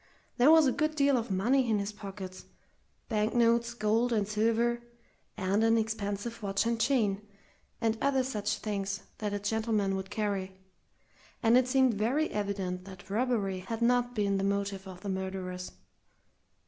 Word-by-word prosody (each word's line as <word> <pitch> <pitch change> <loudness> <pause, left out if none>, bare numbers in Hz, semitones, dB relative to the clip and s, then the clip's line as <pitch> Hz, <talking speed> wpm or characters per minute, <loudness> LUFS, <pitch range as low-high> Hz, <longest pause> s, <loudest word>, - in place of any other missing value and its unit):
There 250 +3 +6
was 320 -1 +7
a 265 - +3
good 310 +3 0
deal 280 -2 +3
of 235 -2 -1
money 235 +7 +2
in 215 - +3
his 200 +1 -2
pockets 195 -2 -8 0.6
bank 215 0 0
notes, 235 0 +3
gold, 225 +2 +1
and 210 -3 +1
silver 230 +3 +1 0.6
and 200 +2 +1
an 225 0 +4
expensive 220 0 -3
watch 200 +1 0
and 230 0 0
chain, 220 -6 +2 0.6
and 225 -1 0
other 270 -2 +2
such 210 -5 -2
things 200 -2 -3 0.2
that 210 -1 -2
a 205 - -1
gentleman 210 -1 0
would 190 0 -5
carry; 200 -3 -2 0.9
and 225 +1 +5
it 255 0 +4
seemed 260 -1 +3
very 245 +10 0
evident 195 -3 -3
that 190 0 -11
robbery 210 -4 0
had 225 +5 -4
not 245 0 +2
been 200 -2 +1
the - - -1
motive 200 -1 -1
of 185 -1 -10
the 205 - -5
murderers. 190 -1 -4
215 Hz, 160 wpm, -30 LUFS, 195-235 Hz, 0.9 s, was